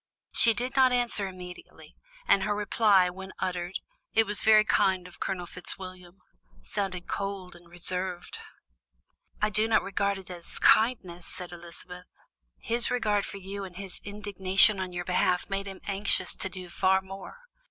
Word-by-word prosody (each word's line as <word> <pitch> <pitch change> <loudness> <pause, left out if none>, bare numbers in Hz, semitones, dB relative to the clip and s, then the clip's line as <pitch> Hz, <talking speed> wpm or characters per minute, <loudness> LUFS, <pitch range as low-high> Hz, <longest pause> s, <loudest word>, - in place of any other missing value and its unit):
She 230 -1 +5
did 250 +4 -3
not 260 -1 +5
answer 240 -5 +1
immediately, 180 -1 -11 0.3
and 195 - +5
her 205 +1 0
reply, 205 -3 +3
when 190 +1 -9
uttered: 180 0 -3 0.4
"It 225 - +5
was 210 -1 -2
very 215 -1 +6
kind 185 -3 +2
of 180 - -16
Colonel 180 -2 -3
Fitzwilliam," 180 0 -5 0.5
sounded 185 - -4
cold 195 -3 -4
and 175 0 -16
reserved. 180 +1 -1 1.0
"I 210 - +3
do 215 +2 +2
not 225 - +3
regard 200 0 -1
it 190 -1 -11
as 175 -1 -8
kindness," 190 -7 +3
said 180 -1 -7
Elizabeth; 175 +1 -10 0.5
"his 235 +1 +1
regard 210 -5 +1
for - - -7
you 195 +1 -6
and 185 -2 -9
his 195 -1 -9
indignation 200 -1 +4
on 185 -1 -3
your 175 0 -4
behalf 180 +1 +1
made 195 0 -2
him 195 -1 -8
anxious 195 -2 0
to 190 - -2
do 185 -2 -8
far 190 +1 +3
more. 195 - -9
190 Hz, 160 wpm, -28 LUFS, 180-205 Hz, 1.0 s, very